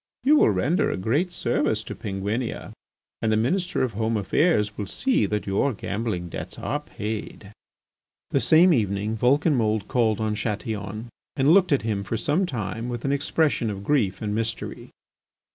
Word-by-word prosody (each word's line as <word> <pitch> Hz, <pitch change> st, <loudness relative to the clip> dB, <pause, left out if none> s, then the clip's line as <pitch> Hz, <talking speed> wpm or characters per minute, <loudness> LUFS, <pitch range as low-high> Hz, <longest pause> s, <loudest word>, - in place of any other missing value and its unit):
You 290 Hz, +4 st, +5 dB
will -, -, +5 dB
render 145 Hz, -, +1 dB
a -, -, -2 dB
great 140 Hz, -, 0 dB
service 115 Hz, -8 st, 0 dB
to -, -, -6 dB
Penguinia, 105 Hz, +3 st, -4 dB, 0.5 s
and 110 Hz, -, +1 dB
the 110 Hz, -, +3 dB
Minister 180 Hz, -, 0 dB
of 125 Hz, -4 st, -1 dB
Home 110 Hz, +2 st, 0 dB
Affairs 105 Hz, -, +1 dB
will 105 Hz, -, -4 dB
see 260 Hz, -, +1 dB
that 105 Hz, -1 st, -2 dB
your 100 Hz, +8 st, +1 dB
gambling 100 Hz, -3 st, -3 dB
debts -, -, -6 dB
are 145 Hz, +4 st, -2 dB
paid." 105 Hz, -6 st, -6 dB, 0.8 s
The 140 Hz, -, +3 dB
same 160 Hz, +8 st, +5 dB
evening 105 Hz, -3 st, 0 dB
Vulcanmould 120 Hz, -4 st, +2 dB
called 115 Hz, -3 st, +1 dB
on 110 Hz, -1 st, 0 dB
Chatillon 105 Hz, 0 st, -4 dB, 0.3 s
and 140 Hz, +2 st, +3 dB
looked 190 Hz, -3 st, +4 dB
at 140 Hz, -, +2 dB
him 105 Hz, -3 st, -1 dB
for 115 Hz, +3 st, -3 dB
some 165 Hz, -, +1 dB
time 110 Hz, -, -4 dB
with 120 Hz, 0 st, -5 dB
an 135 Hz, -, +1 dB
expression 140 Hz, -3 st, +1 dB
of 100 Hz, -1 st, -5 dB
grief 110 Hz, -6 st, +1 dB
and 105 Hz, -1 st, -2 dB
mystery. 115 Hz, +1 st, -4 dB
110 Hz, 165 wpm, -25 LUFS, 105-140 Hz, 0.8 s, You